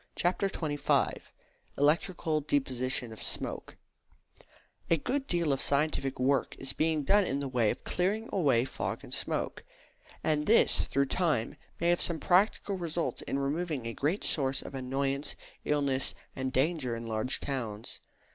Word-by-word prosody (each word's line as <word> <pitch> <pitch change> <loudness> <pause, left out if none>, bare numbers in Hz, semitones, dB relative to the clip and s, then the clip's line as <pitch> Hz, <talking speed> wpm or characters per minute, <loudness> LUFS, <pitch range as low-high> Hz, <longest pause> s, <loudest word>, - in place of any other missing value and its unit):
CHAPTER 185 +3 +1
XXV 150 -5 0 0.6
ELECTRICAL 155 +1 +2
DEPOSITION 130 -4 0
OF 110 - -11
SMOKE - - -2 1.1
A 165 - +4
good 270 - -2
deal 170 -5 +1
of 135 - -1
scientific 140 -2 +1
work 135 +1 +1
is 135 0 -3
being 155 -1 +1
done 205 +8 +5
in 140 -7 -1
the 140 - -2
way 120 -4 +2
of - - -3
clearing 205 +6 0
away 135 -10 +3
fog - - -4
and - - -8
smoke; - - -1 0.6
and 150 -1 +1
this, 230 - +5
through 140 +1 +2
time, 145 -6 0 0.2
may 170 - +2
have 175 - +3
some 170 -2 0
practical 195 +2 +2
results 170 -1 -2
in - - -2
removing 145 -1 -1
a 115 - -3
great 155 - -1
source 135 -2 +1
of - - -9
annoyance, 135 +2 -2 0.3
illness, 140 -3 +1 0.2
and 130 0 -2
danger 135 -2 +1
in 115 0 -6
large 110 +3 0
towns. 115 -6 -4
145 Hz, 150 wpm, -30 LUFS, 130-170 Hz, 1.1 s, done